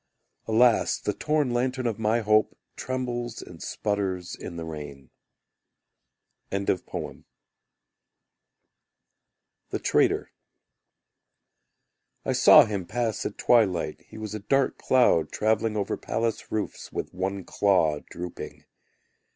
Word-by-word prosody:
Alas, 115 +1 +3
the 105 - -2
torn 150 -1 0
lantern 125 +1 -1
of 115 -2 -1
my 110 +2 +2
hope 110 0 +2 0.2
Trembles 120 -2 -3
and 85 -2 -11
sputters 95 -4 -2
in - - -8
the 85 -1 -5
rain. 75 -4 -8 1.4
The 100 -2 -3 2.6
Traitor - - +2 1.9
I - - +1
saw - - +8
him 100 -5 -4
pass 120 -3 -1
at 105 - -9
twilight; 105 -8 +2
He - - -12
was 110 -1 -6
a 110 - -4
dark 135 +6 +1
cloud 100 -11 +3
travelling 110 0 +1
Over 100 - -1
palace 115 -1 -2
roofs 110 -1 -4
With - - -5
one 95 +1 -3
claw 85 -8 +2
drooping. 90 0 -8
105 Hz, 105 wpm, -26 LUFS, 95-120 Hz, 2.6 s, saw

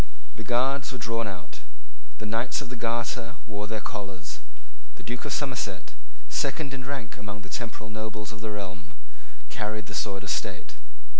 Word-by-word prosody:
The 110 - -3
Guards 135 +5 +5
were 130 - -2
drawn 115 -1 +2
out. 90 -4 -4 0.6
The - - -3
Knights 115 +4 +3
of 140 -4 -3
the 130 - -2
Garter 115 +1 +2
wore 105 -1 -1
their 110 0 +1
collars. 95 -4 -2 0.6
The - - -10
Duke 120 +1 -1
of - - 0
Somerset, 115 - +1 0.3
second 140 - +2
in 130 -1 -2
rank 130 -9 -1
among 105 0 -4
the - - -8
temporal 110 -2 -1
nobles 110 -1 -1
of 105 - -7
the 110 - 0
realm, 95 -2 -3 0.5
carried 105 0 0
the 100 - -6
sword 100 -2 +2
of 95 - +1
state. - - 0
110 Hz, 170 wpm, -31 LUFS, 105-120 Hz, 0.6 s, Guards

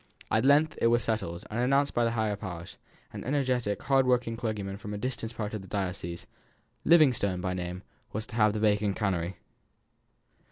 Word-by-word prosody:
At 110 +3 +3
length 150 +3 +4
it - - +5
was 120 0 +3
settled, 90 -7 -2
and 110 - -2
announced 135 +3 +2
by 120 - +2
the - - +2
higher 110 -2 +1
powers. 90 -4 -7 0.4
An - - -6
energetic, 125 -6 0
hard 135 -2 +3
working 125 -2 +2
clergyman 105 -4 -3
from 105 +1 -6
a - - -3
distant 115 0 -4
part 105 -1 -4
of 110 - -3
the 95 - -12
diocese, 90 -3 -3 0.6
Livingstone 125 - +4
by 90 0 -2
name, 90 +1 -5 0.3
was 110 +1 -3
to 115 - -10
have 105 -2 +4
the 105 - -2
vacant 105 -2 +2
canonry. 95 -4 -1
110 Hz, 185 wpm, -29 LUFS, 95-125 Hz, 0.6 s, it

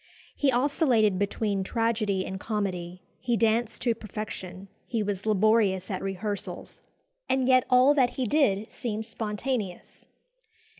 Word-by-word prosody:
He 280 -2 +2
oscillated 245 - +2
between 200 -1 -1
tragedy 215 -3 0
and 190 0 -5
comedy; 185 -5 -3 0.2
he 240 -2 0
danced 225 +1 +1
to 240 -2 +2
perfection; 200 -3 -7 0.2
he 230 -4 -1
was 205 0 -3
laborious 210 -2 +2
at 185 - -3
rehearsals, 195 +1 -5 0.5
and 260 -1 +2
yet 255 -1 +5
all 255 +3 +6
that 260 -4 +3
he 260 - -1
did 220 -5 +1
seemed 220 -2 -4
spontaneous. 215 -2 -4
215 Hz, 130 wpm, -27 LUFS, 195-240 Hz, 0.5 s, all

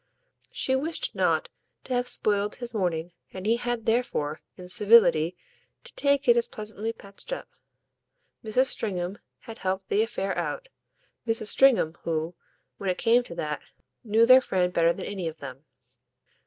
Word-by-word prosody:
She 260 - 0
wished 315 +5 -2
not - - +1 0.3
to 260 - -4
have 245 0 0
spoiled 205 0 +1
his 240 -1 -6
morning, 175 -5 -1 0.2
and 185 0 -7
he 230 +2 +3
had 240 -2 -3
therefore, 225 - -1 0.2
in 180 - -10
civility, 180 -4 +4 0.5
to - - -13
take 280 -1 +1
it 475 - +7
as 475 0 +1
pleasantly 215 - -5
patched 200 - -12
up. - - -4 1.0
Mrs. 225 +4 +2
Stringham 190 -6 -2 0.2
had 225 0 -10
helped 190 0 -3
the 210 - +2
affair 195 -3 -2
out, - - -4 0.6
Mrs. 225 -2 0
Stringham 230 -12 +3
who, 160 +1 -2 0.5
when 195 - -2
it 180 - 0
came 235 +2 +4
to 205 -8 -10
that, 150 -2 -3 0.4
knew 225 0 +4
their 255 +2 +8
friend 180 -6 0
better 170 -1 +4
than - - -6
any 190 -4 -4
of 160 0 -6
them. 135 0 -10
210 Hz, 160 wpm, -26 LUFS, 180-240 Hz, 1.0 s, their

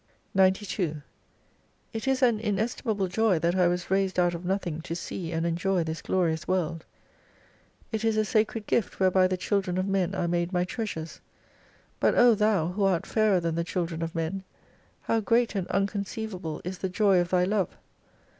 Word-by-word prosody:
69 190 0 +7 0.3
92 160 -6 -2 0.9
It 225 +3 -4
is 265 0 +2
an 235 -4 +4
iuestlmable 215 -1 -1
joy 210 0 +2
that 170 +2 +1
I 180 -2 +4
was 180 +1 -2
raised 190 -1 +1
out 175 -1 +3
of 170 +1 -6
nothing 175 -4 -2
to 165 - -5
see 170 -1 -5
and 165 0 -1
enjoy 175 +2 +1
this 160 0 -4
glorious 165 -3 0
world: 170 -3 -1 1.1
It 220 -1 -2
is 225 -1 +2
a 215 - +2
Sacred 215 +1 0
Gift 230 - 0
whereby 185 0 +4
the 185 0 -1
children 185 -1 -1
of 185 - 0
men 195 -1 0
are 175 - 0
made 175 +1 0
my 180 -1 +1
treasures, 180 -5 -5 0.8
but - - +3
O 240 -1 +7
Thou 210 -6 +2
who 195 +3 -2
art 190 -4 +2
fairer 215 -4 +2
than 165 -1 -1
the 170 +1 -1
children 170 -1 -3
of 165 +1 -4
men, 165 +4 -2 0.6
how 225 - +1
great 230 +2 +2
and 195 -4 -2
unconceivable 195 -4 -3
is 180 +1 -5
the 190 - -2
joy 195 0 +3
of 175 0 0
Thy 180 -1 +3
love 195 -1 0
185 Hz, 185 wpm, -27 LUFS, 170-210 Hz, 1.1 s, 69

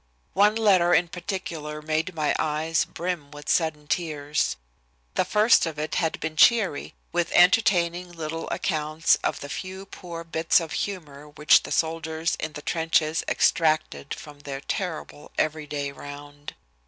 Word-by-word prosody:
One 210 +2 +4
letter 190 -6 +4
in 175 0 +2
particular 170 -4 -5
made 155 +3 -2
my 155 -2 +1
eyes 155 +1 0
brim 170 -4 -4
with 145 0 -11
sudden 160 -3 +1
tears. 150 - -1 0.6
The - - +2
first 210 0 +4
of 160 -2 -5
it 150 0 -3
had 160 -2 0
been 160 0 -4
cheery, 200 - +3 0.2
with 175 -1 0
entertaining 180 -2 +4
little 165 -1 -5
accounts 155 -1 +1
of - - -1
the 145 - -6
few 190 +6 -6
poor 170 -3 -8
bits 165 0 +2
of 165 -2 -6
humor 150 -7 -5
which 150 +1 +5
the - - -9
soldiers 160 0 -1
in 155 0 -4
the 150 - -8
trenches 160 -1 +1
extracted 155 -3 +1
from 150 -1 -12
their 140 -1 -6
terrible 165 -4 -5
every 155 -1 -1
day 145 -1 -3
round. 145 +1 -10
160 Hz, 150 wpm, -25 LUFS, 150-175 Hz, 0.6 s, which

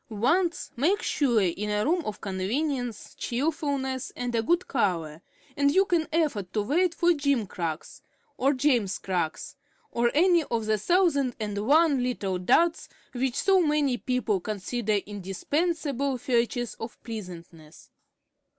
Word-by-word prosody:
Once 330 - 0
make 365 - +1
sure 250 -6 +2
in 190 +4 -1
a 210 0 0
room 340 +3 +1
of 210 -1 -5
convenience, 235 +5 -2
cheerfulness, 275 -1 -2
and 245 -1 -3
a 230 - +2
good 345 +10 +1
color, 165 - -1 0.3
and 280 0 +3
you 385 +1 +5
can 340 -4 +1
afford 285 - 0
to 210 - 0
wait 335 - +1
for 345 +1 +3
gimcracks 215 - -2 0.3
or 270 +2 +2
"Jamescracks" 200 - -1 0.4
or 235 0 +2
any 345 +2 +5
of 230 -4 -2
the 215 -1 +1
thousand 285 - +2
and 210 -2 -3
one 295 -2 +4
little 200 -7 -2
duds 330 - +2 0.2
which 255 0 -1
so 385 -1 +3
many 300 -5 +2
people 245 -5 -1
consider 215 +3 -2
indispensable 270 - -1
features 240 0 0
of 225 +1 -7
pleasantness. 170 -8 -10
245 Hz, 130 wpm, -27 LUFS, 210-300 Hz, 0.4 s, you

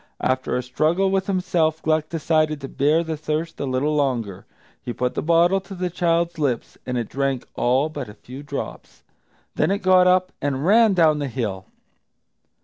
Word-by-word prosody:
After 130 0 0
a 125 - -2
struggle 160 +9 +1
with 195 -1 0
himself 180 -5 0
Gluck 155 -1 +1
decided 155 -2 0
to 135 - -5
bear 150 +5 +2
the 160 -1 -3
thirst 155 +2 -3
a 140 - -2
little 135 +4 0
longer. 120 -9 -1 0.3
He 120 - -5
put 125 +1 -1
the - - -2
bottle 170 +4 +3
to 195 +1 -10
the 180 0 -3
child's 170 -1 0
lips, 130 -6 -1
and 125 -1 -2
it 120 -3 -2
drank 135 -2 -2
all 130 +5 +2
but 155 -8 -6
a 105 - -12
few 130 +4 -10
drops. 145 -1 -7 0.5
Then - - +1
it 200 +1 -1
got 185 -1 +5
up 185 0 +3
and 140 0 -1
ran 215 +1 +5
down 155 -4 +4
the 145 - -2
hill. 105 -7 -4
155 Hz, 185 wpm, -22 LUFS, 130-175 Hz, 0.5 s, got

